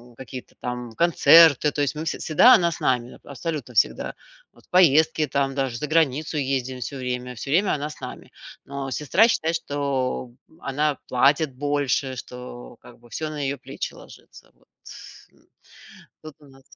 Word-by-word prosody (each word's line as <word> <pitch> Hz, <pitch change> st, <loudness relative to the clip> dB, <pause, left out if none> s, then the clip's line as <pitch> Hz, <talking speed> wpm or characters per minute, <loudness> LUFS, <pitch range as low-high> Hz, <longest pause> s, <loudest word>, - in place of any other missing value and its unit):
какие-то 130 Hz, 0 st, -10 dB
там 125 Hz, -1 st, -5 dB
концерты, 165 Hz, -2 st, +6 dB
то 145 Hz, -, -2 dB
есть 145 Hz, +1 st, -1 dB
мы 155 Hz, -, -4 dB
все -, -, -3 dB
всегда 200 Hz, +11 st, +6 dB
она 175 Hz, -7 st, +4 dB
с -, -, -7 dB
нами, 125 Hz, -1 st, -1 dB
абсолютно 140 Hz, -2 st, -6 dB
всегда. 110 Hz, -, +1 dB, 0.4 s
Вот, -, -, -22 dB
в -, -, -63 dB
поездке 160 Hz, -3 st, +4 dB
там 135 Hz, 0 st, -1 dB
даже, 135 Hz, -4 st, -2 dB
заграницу 155 Hz, +1 st, 0 dB
ездим 130 Hz, -2 st, -2 dB
всё 130 Hz, -, -5 dB
время, 125 Hz, -1 st, -4 dB
всё 125 Hz, +3 st, -8 dB
время 185 Hz, +7 st, +2 dB
она 145 Hz, 0 st, -4 dB
с 150 Hz, -, -12 dB
нами. -, -, -9 dB, 0.4 s
Но 140 Hz, -1 st, -6 dB
сестра 170 Hz, -, +3 dB
считает, 165 Hz, -7 st, 0 dB
что 140 Hz, -4 st, -2 dB, 0.3 s
она 145 Hz, 0 st, -1 dB
платит 140 Hz, +2 st, +2 dB
больше, 140 Hz, -1 st, -1 dB
что 120 Hz, -, -10 dB
как -, -, -16 dB
бы 120 Hz, -, -19 dB
всё 155 Hz, +5 st, -4 dB
на 150 Hz, -, -6 dB
ее 140 Hz, +1 st, -2 dB
плечи -, -, -6 dB
ложится, -, -, -16 dB
вот, -, -, -32 dB, 0.7 s
м. -, -, -29 dB, 0.8 s
Вот 155 Hz, -1 st, -10 dB
у 145 Hz, -, -18 dB
нас 135 Hz, -1 st, -19 dB
140 Hz, 170 wpm, -23 LUFS, 130-155 Hz, 0.8 s, концерты